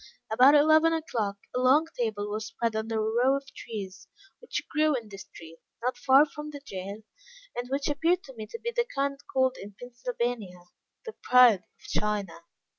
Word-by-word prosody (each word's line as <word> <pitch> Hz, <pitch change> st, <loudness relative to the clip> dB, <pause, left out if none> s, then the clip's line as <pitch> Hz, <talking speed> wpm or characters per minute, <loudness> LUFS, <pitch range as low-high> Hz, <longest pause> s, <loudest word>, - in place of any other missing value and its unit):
About 255 Hz, +6 st, +6 dB
eleven 315 Hz, +2 st, +5 dB
o'clock, 230 Hz, -11 st, -2 dB, 0.2 s
a -, -, +1 dB
long 265 Hz, +5 st, +4 dB
table 215 Hz, -4 st, -2 dB
was 215 Hz, +1 st, -4 dB
spread 230 Hz, -1 st, -2 dB
under 220 Hz, +1 st, -2 dB
a 220 Hz, -, +1 dB
row 245 Hz, +5 st, +2 dB
of 275 Hz, -, -9 dB
trees 195 Hz, -4 st, -7 dB, 0.3 s
which 485 Hz, -, -5 dB
grew 305 Hz, -1 st, +2 dB
in 230 Hz, -4 st, -5 dB
the 195 Hz, -, -9 dB
street, 165 Hz, -3 st, -13 dB, 0.2 s
not 250 Hz, +1 st, 0 dB
far 270 Hz, +2 st, +5 dB
from 300 Hz, 0 st, -8 dB
the 290 Hz, -1 st, -8 dB
jail, 195 Hz, +3 st, -7 dB, 0.5 s
and 245 Hz, +1 st, -4 dB
which 275 Hz, +1 st, -1 dB
appeared 330 Hz, +5 st, +1 dB
to 265 Hz, -, -12 dB
me 220 Hz, -3 st, -8 dB
to -, -, -7 dB
be 470 Hz, -, -4 dB
of 470 Hz, -, -9 dB
the 475 Hz, 0 st, +2 dB
kind 275 Hz, 0 st, -1 dB
called 260 Hz, -1 st, +1 dB
in 200 Hz, 0 st, -10 dB
Pennsylvania, 240 Hz, -, -4 dB, 0.4 s
the 450 Hz, -, -6 dB
pride 245 Hz, -6 st, +6 dB
of -, -, -30 dB, 0.2 s
China. 205 Hz, -5 st, -3 dB
245 Hz, 190 wpm, -28 LUFS, 215-290 Hz, 0.5 s, About